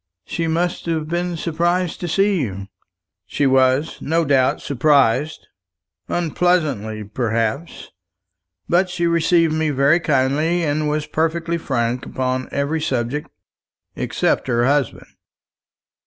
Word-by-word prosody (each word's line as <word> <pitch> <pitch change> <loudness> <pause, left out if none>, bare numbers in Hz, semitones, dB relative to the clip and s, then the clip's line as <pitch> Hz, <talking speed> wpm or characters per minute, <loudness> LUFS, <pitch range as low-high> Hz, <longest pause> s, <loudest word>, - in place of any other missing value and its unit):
"She 165 -1 -2
must 170 +2 -1
have 160 -2 -1
been 175 +1 -2
surprised 175 +2 -1
to 175 - -4
see 195 +1 +2
you." 100 -6 -4 0.6
"She 145 - 0
was, 130 +3 +2
no 165 +2 +1
doubt, 135 -2 +2
surprised 140 0 +2 0.6
unpleasantly, 155 - 0
perhaps; 115 +6 -3 0.8
but 180 +2 +2
she 175 -1 -1
received 170 -1 +3
me 155 0 0
very 140 +4 +3
kindly, 150 +3 +1
and 150 0 0
was 150 0 -1
perfectly 165 +1 -1
frank 125 -4 -2
upon 130 0 -2
every 145 +3 -1
subject 135 0 -2 0.7
except - - -1
her 120 -1 +2
husband. 140 -2 0
150 Hz, 115 wpm, -20 LUFS, 130-170 Hz, 0.8 s, received